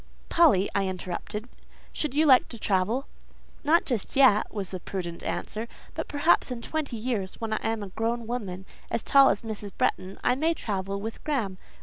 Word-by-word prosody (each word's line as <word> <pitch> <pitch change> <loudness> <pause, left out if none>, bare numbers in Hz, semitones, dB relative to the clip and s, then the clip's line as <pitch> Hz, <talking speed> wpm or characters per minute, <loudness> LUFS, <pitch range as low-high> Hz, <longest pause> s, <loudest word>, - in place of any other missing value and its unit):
"Polly," 260 - +5
I 195 -1 +1
interrupted, 185 +4 -4 0.5
"should 300 -3 -2
you 310 +2 +4
like 260 -4 +6
to 235 - -8
travel?" 215 +6 +1 0.6
"Not 320 +3 +4
just 240 -7 -2
yet," 260 -6 +5
was 200 -3 -4
the 185 - -4
prudent 175 -2 -5
answer; 220 +2 -3 0.3
"but - - -4
perhaps 290 +2 +3
in 240 -2 -5
twenty 290 -5 -3
years, 215 -5 -2
when 225 -1 -3
I 215 - 0
am 225 -2 -2
grown 230 +1 0
a - - -9
woman, 200 -6 -4 0.2
as 230 - -2
tall 275 -1 +7
as 200 - 0
Mrs. 215 -2 -4
Bretton, 185 +1 0
I 250 - +4
may 320 +6 +1
travel 195 -4 -3
with 220 +2 -6
Graham. 225 -11 -1
225 Hz, 185 wpm, -27 LUFS, 195-260 Hz, 0.6 s, tall